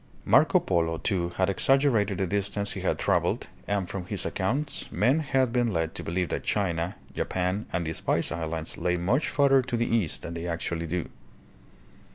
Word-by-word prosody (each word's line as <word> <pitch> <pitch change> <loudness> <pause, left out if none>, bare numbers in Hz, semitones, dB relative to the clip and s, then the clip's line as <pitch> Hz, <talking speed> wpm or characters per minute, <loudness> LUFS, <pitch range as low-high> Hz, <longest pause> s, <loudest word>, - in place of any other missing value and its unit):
Marco - - +5
Polo 80 -1 0
too 85 0 0
had 95 - +3
exaggerated 110 -2 +2
the 95 - +1
distance 100 +1 -1
he - - -4
had - - 0
traveled - - +1 0.2
and 100 -1 0
from 90 -1 -5
his - - -3
accounts 135 +10 -2
men 125 +9 +3
had 130 -5 +1
been 120 -2 +2
led 80 -3 -1
to - - -5
believe 90 0 -1
that - - -3
China, 90 -2 -1 0.2
Japan, 95 +3 -1
and 85 -2 -1
the 80 - -2
Spice - - -1
Islands 80 -1 -4
lay 90 +1 +1
much 120 - +1
further 140 -2 +4
to 125 -1 -2
the 120 - +1
east 85 -14 0
than 85 - -5
they 85 +1 -4
actually 85 0 -2
do. 90 +1 -2
95 Hz, 185 wpm, -27 LUFS, 85-115 Hz, 0.2 s, Marco